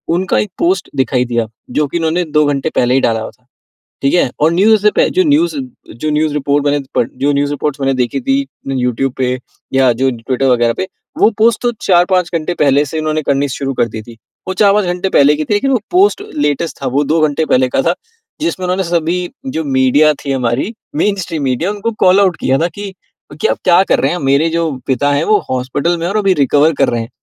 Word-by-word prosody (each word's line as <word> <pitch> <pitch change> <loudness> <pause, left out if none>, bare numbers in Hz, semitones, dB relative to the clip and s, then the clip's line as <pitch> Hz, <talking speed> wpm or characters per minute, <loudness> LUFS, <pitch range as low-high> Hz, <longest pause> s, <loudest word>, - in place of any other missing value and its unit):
उनका 185 +1 0
एक 210 - -2
पोस्ट 350 +3 0
दिखाई 130 -1 +1
दिया, 120 -2 -1 0.2
जो 150 +3 0
कि 170 - -3
उन्होंने 165 +2 0
2 150 -1 +2
घंटे 145 +1 -1
पहले 125 +1 +2
ही 135 - +4
डाला 115 -3 +1
हुआ - - -6
था। 125 - -37 0.6
ठीक 140 - +1
है? 175 - +3
और 155 +2 +3
न्यूज़ 210 +4 +4
से 210 - +5
पह - - +2
जो 370 - +4
न्यूज 315 +2 +2 0.5
जो 155 - -1
न्यूज 150 0 0
रिपोर्ट 145 0 0
बने 145 0 +2 0.2
प - - +4 0.2
जो 145 +1 +2
न्यूज़ 140 0 0
रिपोर्ट्स 145 0 -3
मैंने 135 0 +1
देखी 125 - -1
थी 270 +1 +1 0.3
यूट्यूब 130 0 -1
पे 125 -1 0 0.4
या 135 -1 +4
जो 130 +3 +1
ट्विटर 125 +3 -2
वग़ैरह 120 -2 +2
पे। 185 - -2 0.3
वो - - +5
पोस्ट 225 0 +3
तो 240 - +1 0.2
4-5 180 -1 +3
घंटे 165 +1 -1
पहले 140 0 +3
से 155 +3 -4
उन्होंने 155 0 -1
करनी 140 0 0
शुरू 135 +1 -3
कर 120 - 0
दी 110 0 -6
थी। 115 +1 -13 0.3
वो 190 - -2
4-5 200 +1 +3
घंटे 180 +1 -2
पहले 145 -3 +4
की 155 +1 -3
थी। - - -1
लेकिन 270 +7 +1
वो 255 - +2
पोस्ट 390 +3 +3
लेटेस्ट 165 - -1
था 135 - -2
वो 145 - +3
2 155 +3 +1
घंटे 150 +2 -1
पहले 130 -3 +2
का 135 - +1
था। 170 - +2 0.5
जिसमें 310 - -2
उन्होंने 185 +1 0
सभी 170 0 0 0.4
जो 160 - -1
मीडिया 140 +2 +3
थी 140 - -1
हमारी 130 - -1 0.3
मेनस्ट्रीम 185 -7 -2
मीडिया 135 +9 -1
उनको 210 +2 -3
कॉल 185 +2 +5
आउट 190 -4 +2
किया 135 - +2
था 170 - +2
कि 205 -1 -5 0.5
क्या 440 - +2
आप - - -2
क्या 180 +1 +5
कर - - +4
रहे 135 - +1
हैं, 175 - -2
मेरे 140 +4 +2
जो। 165 -1 -1 0.2
पिता 140 +2 +1
है 145 +2 +1
वो 215 -1 +4
हॉस्पिटल 135 +7 -1
में 165 - -4
है 175 - -1
और - - +1
अभी 195 -3 +3
रिकवर 145 +4 +3
कर - - +4
रहे 120 -1 -1
हैं। 115 - -8
150 Hz, 235 wpm, -15 LUFS, 135-185 Hz, 0.6 s, से